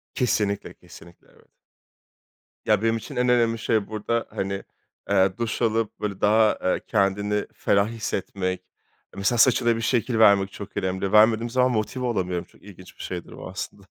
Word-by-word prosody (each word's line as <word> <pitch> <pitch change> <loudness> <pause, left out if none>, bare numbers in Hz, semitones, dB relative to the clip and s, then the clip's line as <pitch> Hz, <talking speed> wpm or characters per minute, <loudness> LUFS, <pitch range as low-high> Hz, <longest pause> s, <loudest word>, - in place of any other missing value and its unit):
Kesinlikle, 105 -5 -1
kesinlikle 85 +1 -17
evet. - - -24 1.2
Ya 105 -1 +3
benim 115 0 +2
için 120 +4 -8
en 125 0 +1
önemli 115 -2 +2
şey 110 -1 0
burada, 110 +2 -2
hani, 100 0 -3 0.5
eee, 95 -1 +3
duş 115 +1 -2
alıp 115 -1 0
böyle 100 -2 -4
daha, 110 +1 +3
eee, 95 - 0
kendini 105 0 0
ferah 100 +1 +2
hissetmek, 95 -4 -3 0.5
mesela 105 +5 0
saçına 120 -2 +4
bir - - -4
şekil 120 0 0
vermek 100 -3 +5
çok 100 - -10
önemli. 95 0 -2
Vermediğim 110 +2 +4
zaman 130 +1 +2
motive 120 +3 -2
olamıyorum. 90 -6 -2
Çok - - -25
ilginç 95 -2 -14
bir - - -8
şeydir 90 -2 -6
bu - - -8
aslında. - - -7
105 Hz, 160 wpm, -24 LUFS, 100-115 Hz, 1.2 s, vermek